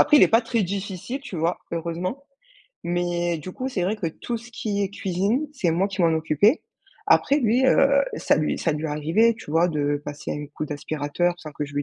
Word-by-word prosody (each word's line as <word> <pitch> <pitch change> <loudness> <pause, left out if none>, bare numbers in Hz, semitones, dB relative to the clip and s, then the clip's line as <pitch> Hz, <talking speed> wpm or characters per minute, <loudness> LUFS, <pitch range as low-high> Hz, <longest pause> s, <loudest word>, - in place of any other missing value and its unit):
après, 300 - +6
il - - +7
est - - +7
pas 225 +1 +5
très 230 -2 0
difficile, 195 +6 -4
tu 240 -8 -9
vois, 165 +2 0
heureusement. 170 - -3 0.6
Mais 175 0 0
du 170 +5 -7
coup 255 +7 -4
c'est 195 -9 -2
vrai 205 +5 0
que 180 - -3
tout 235 +9 -4
ce 235 +2 -11
qui 205 -2 -2
est 195 - 0
cuisine, 200 - -1
c'est 185 - 0
moi 190 +5 +1
qui 190 -2 -2
m'en 165 -1 +4
occupais. 160 - +3 0.5
Après, 280 - +4
lui, 245 +3 +3
heu, 275 +1 +5 0.3
ça - - +2
lui 155 -1 0
ça 165 - +1
lui 150 +2 -3
arrivait, 160 +10 +2
tu 150 - -10
vois, 165 +3 +4
de 145 -2 0
passer 145 0 -6
un 145 0 -5
coup 155 - -3
d'aspirateur 150 +3 -1
sans 155 - -9
que 150 - -3
je 145 0 -10
lui 145 - 0
175 Hz, 225 wpm, -24 LUFS, 155-220 Hz, 0.6 s, il